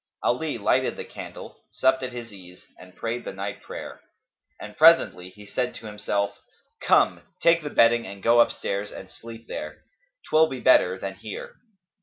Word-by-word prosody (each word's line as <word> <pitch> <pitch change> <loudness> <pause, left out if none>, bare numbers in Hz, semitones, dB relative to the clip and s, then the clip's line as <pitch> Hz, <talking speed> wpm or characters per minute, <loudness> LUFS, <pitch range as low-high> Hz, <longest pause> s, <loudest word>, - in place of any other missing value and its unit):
Ali - - 0
lighted - - +1
the - - -6
candle, - - -10
supped 130 0 +2
at 130 -1 -4
his 120 -3 -8
ease 90 -2 -14
and 90 0 -15
prayed 120 +1 -4
the - - -5
night 100 +1 -6
prayer; - - -9 0.6
and 105 0 -9
presently 155 - +5
he 105 +2 -15
said 125 +4 -3
to 115 - -10
himself, 100 -1 -2 0.4
"Come, - - +3 0.2
take 170 0 +4
the 150 - -5
bedding 115 -3 +4
and 100 0 -10
go 120 +1 +5
upstairs 105 -3 0
and 95 0 -10
sleep 115 0 -11
there; - - -7 0.4
'twill 160 +1 +4
be 130 -4 -6
better 95 -8 +4
than 95 0 -5
here." 100 +2 -8
110 Hz, 170 wpm, -25 LUFS, 100-125 Hz, 0.6 s, presently